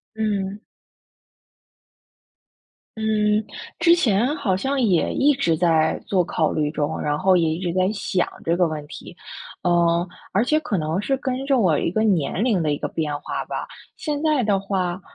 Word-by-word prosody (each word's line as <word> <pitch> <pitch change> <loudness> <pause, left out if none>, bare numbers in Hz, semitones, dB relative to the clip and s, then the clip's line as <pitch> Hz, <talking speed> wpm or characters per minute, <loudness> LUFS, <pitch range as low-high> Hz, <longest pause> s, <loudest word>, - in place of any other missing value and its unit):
嗯。 205 -2 -2 2.4
嗯， 215 -1 +1 0.4
之 340 0 +6
前 245 - +1
好 215 -11 0
像 270 +8 -1
也 185 -8 +2
一 290 +1 +3
直 170 -12 +1
在 160 -2 +2
做 185 -3 +1
考 160 -1 0
虑 150 -1 0
中， 150 -2 -2
然 150 0 -1
后 185 +2 +4
也 165 -2 +2
一 160 - -3
直 175 -2 -2
在 185 +1 +2
想 190 -3 -1 0.2
这 165 +1 +1
个 175 -1 +3
问 155 -2 -5
题， 170 - -10 0.5
呃， 170 0 +2 0.3
而 205 +4 +3
且 305 +4 +2
可 290 -11 -2
能 160 +4 -1
是 270 +5 0
跟 260 0 -3
着 275 -1 +2
我 180 -10 +3
一 - - 0
个 215 +5 0
年 190 -1 +1
龄 215 -9 +2
的 150 -2 +1
一 145 - -2
个 - - -4
变 150 -2 -2
化 - - -4
吧。 - - -4 0.3
现 295 -1 -3
在 305 -5 +2
的 200 -2 +2
话 190 -2 -2
190 Hz, 190 characters per minute, -22 LUFS, 170-230 Hz, 2.4 s, 之